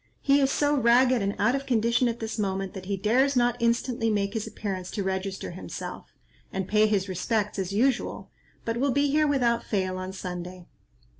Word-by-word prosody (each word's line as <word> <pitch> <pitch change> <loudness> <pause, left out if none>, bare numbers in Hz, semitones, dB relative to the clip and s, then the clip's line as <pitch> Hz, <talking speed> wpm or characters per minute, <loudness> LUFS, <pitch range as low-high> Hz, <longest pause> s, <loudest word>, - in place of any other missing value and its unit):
He 280 0 +4
is 270 - +3
so 290 0 +2
ragged 250 -1 +4
and 200 +1 -1
out 215 +5 +2
of 275 0 -3
condition 235 0 +2
at 235 0 -2
this 220 -1 -4
moment, 195 -1 -2
that 190 -2 -8
he 200 -1 -1
dares 255 +8 +2
not 240 -1 +3
instantly 235 0 +1
make 200 -1 0
his 220 -2 -3
appearance 190 -3 -5
to 205 - -3
register 190 0 -3
himself, 180 - -7 0.4
and 190 -1 -3
pay 215 +1 +4
his 200 -2 0
respects 205 +3 -1
as 190 -1 -2
usual, 245 +5 0 0.3
but 230 0 -1
will 275 +3 +1
be 285 +1 +2
here 305 +1 +3
without 240 -5 +2
fail 185 -3 -1
on 185 0 -5
Sunday." 180 -1 -7
220 Hz, 195 wpm, -27 LUFS, 195-245 Hz, 0.4 s, He